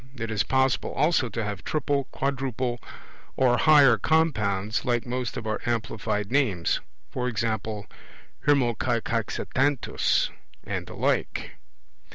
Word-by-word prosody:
It 115 Hz, -3 st, -4 dB
is 105 Hz, -2 st, +1 dB
possible 130 Hz, +2 st, +1 dB
also 145 Hz, -4 st, +2 dB
to 115 Hz, -, -3 dB
have 100 Hz, -2 st, -4 dB
triple, 140 Hz, 0 st, 0 dB
quadruple 130 Hz, -3 st, -2 dB, 0.6 s
or 125 Hz, -2 st, +4 dB
higher 145 Hz, -3 st, +6 dB
compounds, 110 Hz, -11 st, +1 dB
like 120 Hz, -1 st, 0 dB
most 125 Hz, -1 st, -3 dB
of 115 Hz, -, -5 dB
our 110 Hz, -1 st, -2 dB
amplified 110 Hz, -3 st, -2 dB
names; 115 Hz, -12 st, +1 dB, 0.4 s
e.g.' 120 Hz, -2 st, -1 dB, 1.0 s
Hermocaicoxanthus' 125 Hz, +1 st, +1 dB, 0.3 s
and -, -, -4 dB
the -, -, -9 dB
like. -, -, -1 dB
120 Hz, 110 wpm, -26 LUFS, 110-135 Hz, 1.0 s, higher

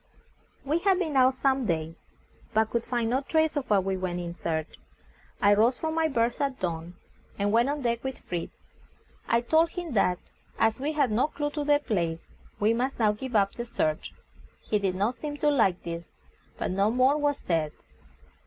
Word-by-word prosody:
We 305 Hz, +4 st, +1 dB
had 380 Hz, +1 st, +3 dB
been 325 Hz, -6 st, -2 dB
out 260 Hz, 0 st, +5 dB
some 265 Hz, -2 st, +1 dB
days, 165 Hz, -1 st, -3 dB, 0.5 s
but 220 Hz, 0 st, +2 dB
could 235 Hz, -1 st, -1 dB
find 235 Hz, -2 st, 0 dB
no 260 Hz, +2 st, +2 dB
trace 315 Hz, +2 st, +1 dB
of 285 Hz, -3 st, -3 dB
what 200 Hz, -3 st, +4 dB
we 190 Hz, 0 st, -1 dB
went 180 Hz, -1 st, -3 dB
in 170 Hz, -1 st, -5 dB
search. 160 Hz, -2 st, -4 dB, 0.6 s
I 205 Hz, 0 st, +5 dB
rose 230 Hz, +5 st, +3 dB
from 315 Hz, 0 st, -2 dB
my 325 Hz, 0 st, +2 dB
berth 240 Hz, -2 st, 0 dB
at 275 Hz, -2 st, -1 dB
dawn, 170 Hz, 0 st, -4 dB, 0.4 s
and 205 Hz, 0 st, 0 dB
went 235 Hz, +4 st, +3 dB
on 290 Hz, -1 st, -2 dB
deck 235 Hz, -1 st, 0 dB
with 265 Hz, -1 st, -4 dB
Fritz. 175 Hz, -2 st, -6 dB, 0.6 s
I 235 Hz, 0 st, +3 dB
told 320 Hz, +7 st, +3 dB
him 345 Hz, -4 st, -5 dB
that 180 Hz, -4 st, +2 dB, 0.4 s
as 225 Hz, +1 st, +2 dB
we 295 Hz, +4 st, -1 dB
had 285 Hz, -6 st, +2 dB
no 235 Hz, +7 st, +2 dB
clue 295 Hz, -1 st, -3 dB
to 295 Hz, -1 st, -3 dB
the 290 Hz, 0 st, +4 dB
place, 170 Hz, -, -2 dB, 0.4 s
we 215 Hz, +2 st, +3 dB
must 255 Hz, +4 st, -1 dB
now 215 Hz, -3 st, +3 dB
give 240 Hz, +3 st, -6 dB
up 200 Hz, -2 st, +3 dB
the 235 Hz, -, -4 dB
search. 155 Hz, -10 st, -2 dB, 0.5 s
He 210 Hz, -, 0 dB
did 190 Hz, -2 st, -1 dB
not 205 Hz, +6 st, +1 dB
seem 290 Hz, +2 st, -6 dB
to 295 Hz, 0 st, +2 dB
like 200 Hz, -10 st, +2 dB
this, 170 Hz, 0 st, -5 dB, 0.5 s
but -, -, -2 dB
no 195 Hz, +3 st, +2 dB
more 255 Hz, +4 st, +3 dB
was 290 Hz, -1 st, +1 dB
said. 160 Hz, -3 st, -1 dB
235 Hz, 200 wpm, -27 LUFS, 190-285 Hz, 0.6 s, out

